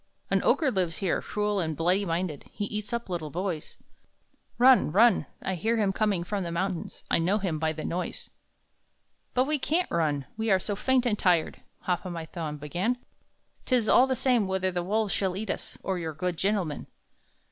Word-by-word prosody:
"An - - +3
Ogre 300 -5 +3
lives 180 -6 -1
here, 190 -4 0
cruel 210 -1 -1
and 160 -4 -2
bloody 180 +5 +2
minded! 165 -4 -3
He 205 - -3
eats 210 0 -5
up 235 0 -2
little 170 -4 -3
boys! 175 -1 -4 0.8
Run, 250 -8 +6
run! 225 +7 +5 0.2
I 190 - -1
hear 225 +6 0
him 200 -3 +2
coming 200 -4 +1
from 200 +2 -2
the 170 - -4
mountains, 180 0 -3
I - - +4
know 185 +5 +2
him 180 -7 -2
by 160 0 +1
the 155 0 -6
noise!" 180 +2 -3 1.0
"But 255 +1 +4
we 300 +1 0
can't 330 +7 0
run, 150 -5 0
we 220 0 -1
are 190 - +6
so 200 +2 -2
faint 255 +4 +2
and 215 -4 +1
tired!" 175 -4 +2 0.2
Hop 180 -1 -1
o' 185 - -5
my 165 -2 -5
Thumb 160 -3 -5
began 175 - -1 0.7
"'Tis 245 -4 +2
all 255 +4 +6
the 260 - +1
same 245 -5 +2
whether 190 0 0
the 175 0 -1
wolves 210 +3 0
shall 190 -2 -1
eat 215 -1 -2
us, - - -6
Or 190 -2 -1
your 160 -2 -4
good 180 +2 -2
gentleman." 185 -4 -1
190 Hz, 195 wpm, -28 LUFS, 170-215 Hz, 1.0 s, Run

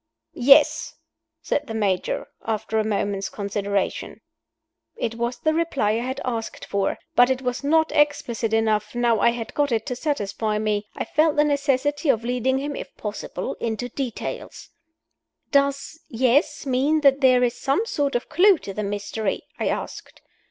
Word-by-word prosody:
"Yes," 275 +4 +4 0.5
said 290 0 -1
the 225 - -5
Major, 195 -4 0 0.2
after 220 0 -1
a - - +2
moment's 200 -2 -1
consideration. 200 -1 -3 0.7
It 230 - -2
was 235 +1 -2
the 315 - +1
reply 315 -10 +1
I 220 - 0
had 260 +2 -4
asked 230 -3 -4
for; 200 -1 -1 0.2
but 245 +1 +6
it 260 0 -1
was 250 +2 -2
not 315 +2 +3
explicit 250 -7 +1
enough, 220 -1 +1
now 240 -2 +2
I - - +5
had 235 -1 -4
got 290 -2 +1
it, 225 -2 0
to 250 - -3
satisfy 220 -6 -2
me. 210 -1 -1
I - - -3
felt 310 0 +2
the 295 - +4
necessity 285 +1 0
of 230 -4 +3
leading 250 +2 0
him 285 +1 -3
(if - - -8
possible) 210 -1 -5
into 230 +2 -3
details. 255 -1 -5 0.8
"Does 280 +2 +1
'Yes' 260 +6 +1
mean 275 +4 +2
that 275 -1 +4
there 255 -2 +5
is 245 0 -1
some 280 +11 +1
sort 285 - -1
of 240 - -1
clew 360 +4 +5
to 195 - -8
the 210 - -3
mystery?" 205 0 -3 0.2
I - - 0
asked. - - -5
245 Hz, 165 wpm, -23 LUFS, 220-285 Hz, 0.8 s, but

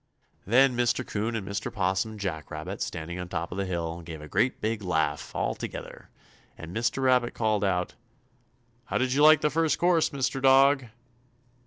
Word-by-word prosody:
Then 125 +4 +4
Mr. 120 +1 +1
'Coon 110 +3 -2
and 100 -4 -4
Mr. 100 0 -4
'Possum 95 +2 0
and 105 - -10
Jack 80 -7 -4
Rabbit, - - -6
standing 85 +1 -4
on 90 0 -6
top 85 -1 -4
of 90 - -4
the 100 - -1
hill, 85 -1 -3
gave 80 -2 -8
a 75 - -10
great 105 - 0
big 110 0 -2
laugh, 80 -5 -1
all - - 0
together, - - -8 0.5
and 80 +2 -9
Mr. 120 +4 0
Rabbit 125 -2 +2
called 110 -2 0
out: 90 -2 0 0.9
"How - - -1
did 130 0 0
you 140 - +2
like 155 0 +7
the 150 - +1
first 165 -1 +1
course, 175 -2 +3
Mr. 135 -1 -2
Dog?" 135 0 +5
110 Hz, 185 wpm, -27 LUFS, 90-130 Hz, 0.9 s, like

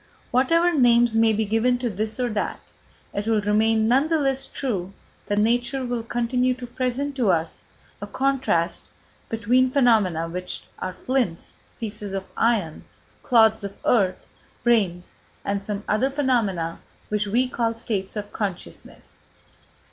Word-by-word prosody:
Whatever 335 +7 +3
names 240 -4 +4
may 225 0 +4
be 220 0 0
given 225 +4 +2
to 245 0 -2
this 215 +2 -3
or 250 - +1
that, 210 -1 -2 0.5
it 205 +2 -3
will 225 -1 +3
remain 220 +2 +2
none 265 +6 +3
the 325 0 +2
less 270 -2 0
true 195 -8 -3 0.3
that 205 - 0
nature 240 +4 +1
will 245 -1 -2
continue 245 +2 0
to 255 0 -8
present 255 +3 -2
to 235 -6 +2
us 165 -2 0 0.4
a 205 - -5
contrast 255 -9 0 0.4
between 240 +4 +2
phenomena 220 - +3
which 180 +2 -5 0.2
are 185 - -4
flints, 245 -8 -2 0.3
pieces 210 -3 -4
of 195 -1 -3
iron, 210 -9 0 0.4
clods 220 -3 +4
of 200 0 -6
earth, 195 -6 +2 0.4
brains 195 -7 +1 0.3
and 200 0 -1
some 205 0 -4
other 215 +6 +2
phenomena 230 - 0 0.3
which 210 0 0
we 245 +5 +2
call 230 -2 -1
states 215 -4 -3
of 205 -1 -6
consciousness. 180 - -6
225 Hz, 145 wpm, -24 LUFS, 200-250 Hz, 0.5 s, names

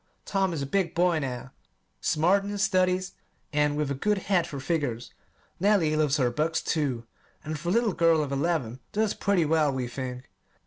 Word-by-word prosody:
Tom 195 -2 0
is 155 -4 -3
a - - -2
big 175 +3 -1
boy 175 -1 +3
now, 130 -2 -5 0.5
smart 180 +6 +2
in 200 - -5
his 205 0 -1
studies 185 -1 +1 0.4
and 150 0 +2
with 150 -2 -1
a - - +1
good 205 +10 0
head 190 -2 +1
for 140 - -6
figures. 130 -5 -2 0.5
Nellie 185 -5 +3
loves 150 -2 +2
her 125 -4 +2
books, 160 +6 0
too; 135 -7 -1 0.4
and, 155 0 -4
for 170 +3 -3
a - - +2
little 225 -1 +2
girl 165 -2 +3
of 140 - -5
eleven, 140 -4 -1
does 215 0 +1
pretty 190 -4 +1
well, 155 -1 +2
we 130 -2 -2
think. 125 0 -6
155 Hz, 190 wpm, -27 LUFS, 140-185 Hz, 0.5 s, boy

